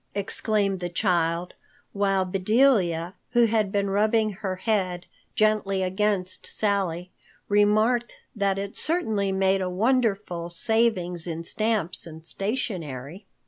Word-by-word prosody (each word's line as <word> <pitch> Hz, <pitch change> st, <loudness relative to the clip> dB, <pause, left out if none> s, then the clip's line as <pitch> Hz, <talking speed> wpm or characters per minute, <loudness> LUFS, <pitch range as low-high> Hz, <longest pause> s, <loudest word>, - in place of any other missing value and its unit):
exclaimed 200 Hz, -1 st, 0 dB
the 175 Hz, 0 st, -4 dB
child, 175 Hz, -2 st, 0 dB, 0.4 s
while 195 Hz, -2 st, +1 dB
Bedelia, 185 Hz, -3 st, +2 dB, 0.2 s
who 240 Hz, -1 st, +5 dB
had 215 Hz, -3 st, +1 dB
been 200 Hz, 0 st, 0 dB
rubbing 215 Hz, +1 st, +2 dB
her 190 Hz, -1 st, -4 dB
head 185 Hz, -3 st, -1 dB, 0.3 s
gently 210 Hz, -3 st, +1 dB
against 190 Hz, 0 st, -1 dB
Sally, 185 Hz, -4 st, 0 dB, 0.4 s
remarked 215 Hz, +4 st, +2 dB, 0.2 s
that 200 Hz, -2 st, 0 dB
it 200 Hz, 0 st, -5 dB
certainly 220 Hz, -, +1 dB
made 190 Hz, 0 st, +1 dB
a 185 Hz, -, -1 dB
wonderful 200 Hz, -5 st, 0 dB
saving 185 Hz, -2 st, +1 dB
in 165 Hz, 0 st, -4 dB
stamps 210 Hz, -3 st, +1 dB
and 160 Hz, 0 st, -11 dB
stationery. 185 Hz, -, -3 dB
195 Hz, 115 wpm, -25 LUFS, 180-215 Hz, 0.4 s, who